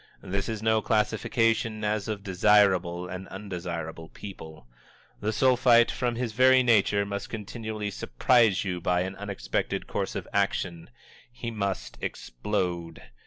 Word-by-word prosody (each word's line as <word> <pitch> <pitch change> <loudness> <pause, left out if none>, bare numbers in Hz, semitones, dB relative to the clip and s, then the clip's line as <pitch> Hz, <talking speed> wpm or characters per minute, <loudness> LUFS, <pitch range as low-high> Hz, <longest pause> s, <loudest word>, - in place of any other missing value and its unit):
This 100 +2 -2
is 110 -1 -4
no 110 -1 +3
classification 110 +1 +1
as 105 0 -1
of 105 -3 -4
desirable 95 -3 +3
and 90 +1 -7
undesirable 85 -4 -6
people. 80 -9 -10 0.5
The 105 - -1
Sulphite, 120 0 +4
from 120 -2 -1
his 120 -1 -2
very 130 +2 +6
nature, 105 -3 +3
must 100 0 -5
continually 110 -1 -5
surprise 105 - +2
you 90 -2 -3
by 90 +1 +1
an 95 +1 -3
unexpected 100 -1 -3
course - - -3
of - - -4
action. 95 -3 -1 0.4
He 120 -1 -5
must 100 -3 -3
explode. 85 +3 -3
100 Hz, 130 wpm, -27 LUFS, 90-110 Hz, 0.5 s, very